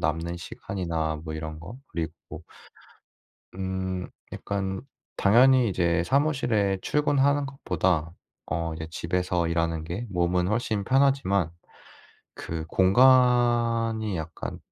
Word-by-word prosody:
남는 80 +3 -1
시간이나 80 -3 -4
뭐 80 0 -5
이런 80 0 -6
거. 95 +8 -9
그리고 80 -1 -6 1.1
음 95 -1 -3 0.2
약간 95 0 -3 0.4
당연히 125 +4 +5
이제 85 -2 +1
사무실에 125 -8 +1
출근하는 145 -1 +2
것보다 90 - -1 0.3
어 80 +1 -2
이제 80 0 -6
집에서 90 +1 -1
일하는 85 -1 -1
게 90 +9 -5
몸은 90 0 +1
훨씬 105 -1 -1
편하지만 130 - +2 0.8
그 80 -1 -5
공간이 115 0 +3
약간 80 0 -6
95 Hz, 230 characters per minute, -26 LUFS, 85-120 Hz, 1.1 s, 당연히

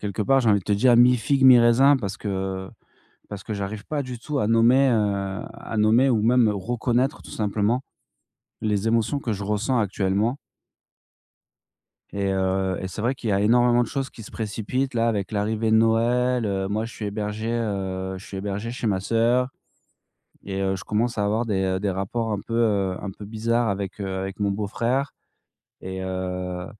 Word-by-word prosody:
quelque 105 0 -4
part, 135 +6 +3
j'ai 115 - +3
envie 100 - +4
de 90 - -10
te 105 - 0
dire 120 +5 +4
mi-figue 125 +3 +4
mi-raisin 130 +2 +7
parce 100 -5 -4
que 95 -2 -3 0.6
parce 100 -2 -7
que 110 - -5
j'arrive 100 +1 -5
pas 150 -2 -2
du 125 -2 -6
tout 140 +4 -3
à 105 - +1
nommer, 120 +4 +4
heu, 100 -3 0
à 115 - -8
nommer 110 +5 +4
ou 115 -4 +2
même 120 0 +4
reconnaître 120 +6 -1
tout - - -13
simplement 110 +4 0 0.8
les 105 0 0
émotions 115 +5 +1
que 115 -5 -2
je 100 0 -5
ressens 105 +5 0
actuellement 105 +3 0 1.8
et 100 -1 -1
heu, 95 -1 0
et 95 - -4
c'est 95 +3 -6
vrai 120 +4 +1
qu'il 120 - -5
y - - +2
a 100 - +1
énormément 120 +3 +4
de 120 - -3
choses 135 -1 -3
qui 115 - -12
se - - -11
précipitent 115 +5 -3
là 115 0 +2
avec 100 -4 -2
l'arrivée 110 +1 -1
de 110 - +5
Noël, 120 +2 +2
heu. 95 -1 -1
Moi, 110 +3 -1
je 115 - -10
suis 110 - -6
hébergé 105 +2 -3
heu, 95 -5 -2
je 95 - -11
suis 95 - -7
hébergé 100 +3 -4
chez 125 0 -4
ma 100 -3 +1
sœur 115 +5 +2 1.0
et 95 0 -4
heu, 95 0 0
je 95 - -8
commence 115 +3 -1
à 105 - +1
avoir 110 +3 0
des 95 -2 0
des 105 - 0
rapports 100 +4 -2
un 100 - -2
peu 105 -4 0
un 100 - -4
peu 100 +2 -10
bizarres 115 +2 0
avec, 100 0 -4
heu, 100 - -3
avec 95 +1 -5
mon 100 -1 +1
beau-frère 115 +7 -1 0.7
et 95 0 -5
heu, 90 -1 -4
110 Hz, 190 wpm, -24 LUFS, 100-120 Hz, 1.8 s, mi-raisin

